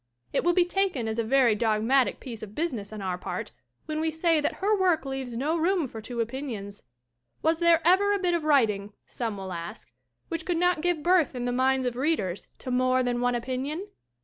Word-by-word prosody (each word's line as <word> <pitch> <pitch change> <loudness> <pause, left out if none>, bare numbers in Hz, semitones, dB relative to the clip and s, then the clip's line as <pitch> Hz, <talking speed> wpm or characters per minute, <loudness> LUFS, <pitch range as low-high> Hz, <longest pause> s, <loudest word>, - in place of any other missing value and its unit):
It - - +1
will 350 +1 +3
be 360 - +5
taken 355 - 0
as 220 +1 -2
a - - +2
very 250 0 +4
dogmatic 225 +4 +2
piece 230 -4 -8
of 215 -1 -9
busi 335 -1 -1
ness 205 -3 -6
on 215 -2 -6
our 180 -1 -2
part - - -5 0.3
when 310 0 -2
we 320 - +1
say 320 0 +2
that 295 - 0
her 415 +3 +1
work 360 -6 +2
leaves 265 -3 -4
no 295 +6 0
room 340 -1 +1
for 225 -2 -8
two 235 +2 -6
opinions. 225 -5 -5 0.6
Was 320 +1 +2
there 340 -1 +4
ever 395 +3 +5
a 405 - +3
bit 360 -3 +1
of 340 -2 0
writing, 215 -9 +2
some 225 -4 -4
will 190 -1 -6
ask, 170 -8 -7 0.3
which 330 -1 -4
could 350 0 -1
not 355 -2 +2
give 345 -3 0
birth 345 -6 +3
in 245 -1 -3
the 245 - 0
minds 260 +1 +2
of 245 -1 -1
readers 250 - -1
to 255 - -6
more 255 +1 +2
than 245 -1 -1
one 245 0 +1
opinion? 265 - -3
265 Hz, 220 wpm, -27 LUFS, 230-330 Hz, 0.6 s, be